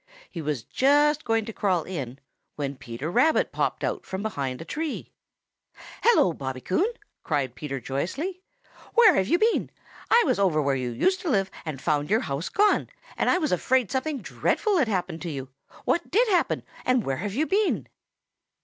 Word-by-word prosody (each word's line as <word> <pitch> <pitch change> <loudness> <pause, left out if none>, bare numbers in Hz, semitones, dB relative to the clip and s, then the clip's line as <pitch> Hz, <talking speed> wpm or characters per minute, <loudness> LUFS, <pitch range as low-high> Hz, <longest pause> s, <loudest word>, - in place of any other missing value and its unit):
He 170 - -5
was 145 -6 -2
just 295 +2 +3
going 225 -1 +1
to 225 - -6
crawl 185 -6 +1
in, 135 -9 -5 0.4
when 140 -1 -3
Peter 130 +4 -6
Rabbit 285 - +3
popped - - -1
out - - -2
from 190 +2 -5
behind 140 -12 -3
a 165 - -7
tree. 310 - -4 0.9
"Hello, 445 - +4
Bobby 130 -3 -5
Coon!" 190 - 0 0.3
cried 140 -6 -1
Peter 135 0 -5
joyously. 260 - -3 0.5
"Where 455 -5 +8
have 190 - +1
you 345 - +3
been? 445 +4 +2 0.4
I 470 +1 +6
was 255 -8 +1
over 180 -6 +3
where 140 -2 +1
you 125 -2 -2
used 375 - +1
to 350 - -2
live 195 -6 +1
and 155 -4 -4
found 150 +1 0
your 220 +3 +3
house 140 +5 -3
gone, 415 +1 +2 0.3
and - - +1
I - - +4
was 310 -5 -1
afraid 245 +5 +1
something 270 0 -2
dreadful 420 -4 0
had 265 - +3
happened 180 -5 -2
to 175 - -4
you. 135 -3 -5 0.4
What 340 - 0
did 465 +7 +3
happen, 360 -4 +1 0.2
and 255 -2 +2
where 135 -1 -1
have 200 +4 -4
you 300 +5 +2
been?" 400 +4 +1
195 Hz, 185 wpm, -26 LUFS, -, 0.9 s, Where